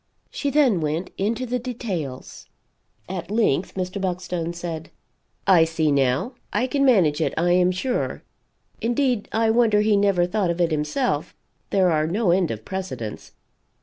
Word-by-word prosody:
She 285 Hz, -, -2 dB
then 270 Hz, -, +3 dB
went 155 Hz, +4 st, -2 dB
into 225 Hz, +6 st, -1 dB
the 250 Hz, +1 st, -2 dB
details. 195 Hz, -, -5 dB, 0.6 s
At 180 Hz, -2 st, -5 dB
length 205 Hz, -6 st, +1 dB
Mr. 185 Hz, +1 st, -3 dB
Buckstone 180 Hz, -2 st, -2 dB
said: 170 Hz, -2 st, -6 dB, 0.6 s
"I 180 Hz, -4 st, +6 dB
see 160 Hz, -2 st, 0 dB
now. 140 Hz, -, +1 dB, 0.2 s
I 210 Hz, +5 st, +1 dB
can 275 Hz, +2 st, 0 dB
manage 180 Hz, -, +4 dB
it, -, -, 0 dB
I 175 Hz, +2 st, +2 dB
am 180 Hz, 0 st, +4 dB
sure. 245 Hz, +8 st, -2 dB, 0.6 s
Indeed 240 Hz, -1 st, 0 dB
I 225 Hz, 0 st, +2 dB
wonder 220 Hz, -3 st, +4 dB
he 210 Hz, 0 st, +3 dB
never 200 Hz, -3 st, +3 dB
thought 190 Hz, 0 st, 0 dB
of 170 Hz, +1 st, -2 dB
it 170 Hz, -2 st, +2 dB
himself 155 Hz, -, -1 dB, 0.3 s
there 190 Hz, -3 st, +3 dB
are 155 Hz, -1 st, +1 dB
no 195 Hz, +2 st, +1 dB
end 180 Hz, -2 st, +2 dB
of 110 Hz, -1 st, -6 dB
precedents. 185 Hz, -, -6 dB
185 Hz, 155 wpm, -23 LUFS, 165-220 Hz, 0.6 s, I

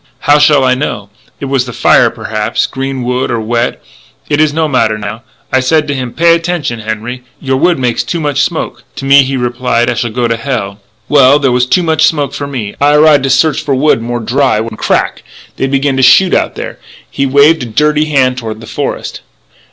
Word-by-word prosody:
"How 145 Hz, +1 st, +4 dB
shall 145 Hz, -2 st, +4 dB
I 130 Hz, -1 st, +3 dB
know? 105 Hz, -7 st, -4 dB, 0.3 s
It -, -, -5 dB
was 135 Hz, -2 st, 0 dB
the 125 Hz, -, -8 dB
fire, -, -, +3 dB
perhaps, 105 Hz, -1 st, -2 dB
green 135 Hz, -1 st, -4 dB
wood 125 Hz, +1 st, -1 dB
or 120 Hz, -, -1 dB
wet 120 Hz, +2 st, -2 dB, 0.5 s
it 145 Hz, +1 st, +2 dB
is 155 Hz, -1 st, +2 dB
no 160 Hz, +1 st, 0 dB
matter 115 Hz, -6 st, +1 dB
now.... 105 Hz, +2 st, -6 dB, 0.3 s
I 130 Hz, -, +4 dB
said 150 Hz, +4 st, +1 dB
to 145 Hz, -, -1 dB
him, 130 Hz, -3 st, -4 dB
'Pay 170 Hz, +4 st, +3 dB
attention, 165 Hz, -8 st, -2 dB
Henri; 110 Hz, +3 st, -5 dB, 0.2 s
your 135 Hz, -2 st, -1 dB
wood 175 Hz, +4 st, +2 dB
makes 125 Hz, -3 st, -1 dB
too 170 Hz, -, -3 dB
much 145 Hz, -3 st, -1 dB
smoke.' -, -, -3 dB
To -, -, -6 dB
me 140 Hz, +1 st, +6 dB
he 135 Hz, 0 st, -2 dB
reply 120 Hz, -1 st, 0 dB
I -, -, +1 dB
shall 120 Hz, 0 st, -2 dB
go 120 Hz, +2 st, -1 dB
to 115 Hz, 0 st, -1 dB
hell.... 115 Hz, -6 st, -4 dB, 0.3 s
Well, 140 Hz, -1 st, +5 dB
there 135 Hz, -3 st, +1 dB
was 125 Hz, 0 st, +1 dB
too 180 Hz, +7 st, +2 dB
much 160 Hz, -1 st, +1 dB
smoke 145 Hz, -4 st, -1 dB
for 140 Hz, -, -5 dB
me. 120 Hz, -8 st, -5 dB
I 145 Hz, +1 st, +4 dB
arise 150 Hz, -1 st, +5 dB
to 135 Hz, -, -1 dB
search 140 Hz, +2 st, +2 dB
for 140 Hz, -3 st, -1 dB
wood 135 Hz, -3 st, +2 dB
more 120 Hz, +1 st, -3 dB
dry, 120 Hz, 0 st, 0 dB
when, 110 Hz, 0 st, -5 dB
crack! -, -, -1 dB, 0.4 s
they 135 Hz, -, -1 dB
begin 135 Hz, 0 st, 0 dB
to -, -, +2 dB
shoot 175 Hz, +8 st, +5 dB
out -, -, 0 dB
there -, -, -7 dB, 0.2 s
" -, -, -25 dB
He 140 Hz, -, +1 dB
waved 145 Hz, +4 st, +4 dB
a 125 Hz, -, -4 dB
dirty 150 Hz, +6 st, +1 dB
hand 130 Hz, -4 st, +1 dB
toward 110 Hz, -2 st, -6 dB
the 110 Hz, -, -11 dB
forest. -, -, -5 dB
130 Hz, 220 wpm, -11 LUFS, 120-145 Hz, 0.5 s, me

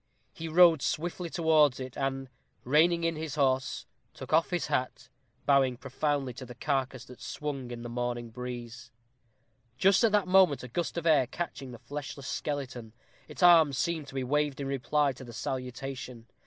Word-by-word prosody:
He 165 Hz, -, -6 dB
rode 165 Hz, -2 st, +6 dB
swiftly 175 Hz, +4 st, -2 dB
towards 155 Hz, -5 st, +3 dB
it, 130 Hz, -1 st, -7 dB
and, 135 Hz, -1 st, -2 dB, 0.4 s
reining 165 Hz, +6 st, +3 dB
in 165 Hz, 0 st, +1 dB
his 155 Hz, -1 st, -5 dB
horse, 130 Hz, -3 st, 0 dB, 0.3 s
took -, -, -7 dB
off 165 Hz, +1 st, +4 dB
his 175 Hz, -2 st, -1 dB
hat, 130 Hz, -4 st, -2 dB, 0.4 s
bowing 135 Hz, -3 st, +3 dB
profoundly 135 Hz, 0 st, -2 dB
to 130 Hz, +2 st, -9 dB
the 125 Hz, -, -10 dB
carcase 135 Hz, -1 st, -2 dB
that 125 Hz, -, -14 dB
swung 140 Hz, -4 st, -5 dB
in 120 Hz, -1 st, -7 dB
the -, -, -5 dB
morning 120 Hz, -1 st, -3 dB
breeze. 120 Hz, 0 st, -7 dB, 0.9 s
Just 195 Hz, +3 st, +4 dB
at 225 Hz, -, +4 dB
that 205 Hz, -3 st, +2 dB
moment 185 Hz, -7 st, +4 dB
a -, -, -6 dB
gust 170 Hz, +8 st, -3 dB
of 170 Hz, -, -3 dB
air 150 Hz, -6 st, +4 dB
catching 140 Hz, -2 st, -5 dB
the 120 Hz, -, -9 dB
fleshless 140 Hz, +1 st, -7 dB
skeleton, 130 Hz, -6 st, -4 dB, 0.3 s
its -, -, -5 dB
arms 160 Hz, -6 st, +7 dB
seemed 165 Hz, -4 st, -1 dB
to 135 Hz, -, -11 dB
be 135 Hz, -, -1 dB
waved 145 Hz, +1 st, 0 dB
in 140 Hz, -, -3 dB
reply 140 Hz, +2 st, +1 dB
to 130 Hz, -, -11 dB
the 120 Hz, -2 st, -10 dB
salutation. 130 Hz, -1 st, -5 dB
140 Hz, 175 wpm, -29 LUFS, 125-160 Hz, 0.9 s, arms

